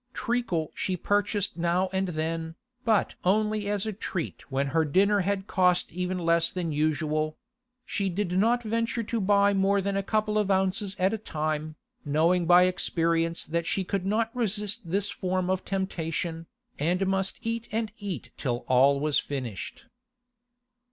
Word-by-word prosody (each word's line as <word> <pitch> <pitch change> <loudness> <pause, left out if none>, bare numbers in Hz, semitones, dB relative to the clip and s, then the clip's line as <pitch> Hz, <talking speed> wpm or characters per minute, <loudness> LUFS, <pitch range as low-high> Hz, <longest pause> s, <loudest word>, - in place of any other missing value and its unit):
Treacle 225 -10 -1
she 185 -1 -2
purchased 205 +1 0
now 175 +2 +1
and 190 0 0
then, 165 0 -3 0.3
but 220 -4 +2
only 210 +2 +1
as 205 0 0
a 215 - -2
treat 185 -7 -5
when 135 +1 +1
her 160 +4 +2
dinner 200 +7 +3
had 195 0 -1
cost 180 -2 +2
even 180 +1 -2
less 170 -1 +2
than 175 -3 -2
usual; 155 0 0 0.5
she 200 -2 -1
did 185 0 -2
not 230 +6 +2
venture 230 +1 -1
to 225 0 -2
buy 200 +1 +4
more 195 +1 +3
than 195 +1 -1
a 195 - +1
couple 215 +1 0
of 205 -2 0
ounces 190 +1 +1
at 190 +3 +2
a 220 - -2
time, 155 -4 -3 0.3
knowing 165 +4 +2
by 180 +1 +7
experience 165 -2 0
that 170 +1 -2
she 190 - 0
could 190 0 -2
not 225 +3 0
resist 210 -2 -1
this 200 +3 0
form 185 -1 -1
of 190 0 -1
temptation, 165 -3 -3 0.3
and 180 +5 +1
must 190 0 0
eat 230 +1 -2
and 220 -1 -1
eat 180 - -5
till 120 -3 -2
all 135 +2 +5
was 150 0 +2
finished. 125 -8 -5
185 Hz, 160 wpm, -27 LUFS, 165-205 Hz, 0.5 s, by